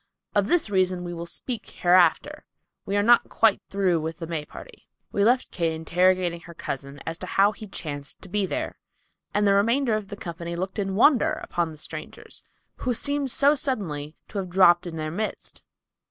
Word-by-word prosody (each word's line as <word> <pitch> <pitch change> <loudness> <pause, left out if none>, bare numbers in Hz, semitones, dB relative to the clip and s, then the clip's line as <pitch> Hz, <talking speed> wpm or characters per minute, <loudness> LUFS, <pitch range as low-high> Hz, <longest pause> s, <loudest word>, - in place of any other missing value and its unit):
Of 205 -1 +2
this 320 -7 +2
reason 185 -2 +1
we 175 0 -5
will 170 0 -6
speak 230 +6 -5
hereafter. 180 - +3 0.4
We 200 +1 0
are 205 - +3
not 240 +2 +5
quite 225 -3 +3
through 190 -4 +1
with 160 +1 -4
the 165 - -5
May 160 -2 -4
party. - - -13 0.2
We 200 - +1
left 245 +4 +3
Kate 165 -2 0
interrogating 175 +2 +1
her 170 0 -13
cousin 140 -1 -5
as 165 +1 -4
to 185 - -6
how 200 +3 +4
he 215 +1 -10
chanced 145 -6 -7
to - - -9
be 200 +1 0
there, - - -4 0.5
and 205 0 +2
the 200 - +5
remainder 230 +5 +2
of 215 -2 -2
the 205 - -8
company 170 -1 -6
looked 190 +4 -4
in 195 -1 -1
wonder 245 +3 +5
upon 170 -1 -1
the 155 - -10
strangers, 165 - -7 0.4
who 250 -2 -1
seemed 285 +2 0
so 280 +3 +5
suddenly 165 - -2
to 205 - -3
have 185 -2 -4
dropped 175 -1 +5
in 165 - -6
their 155 -1 -3
midst. 215 +6 -5
185 Hz, 195 wpm, -25 LUFS, 170-215 Hz, 0.5 s, not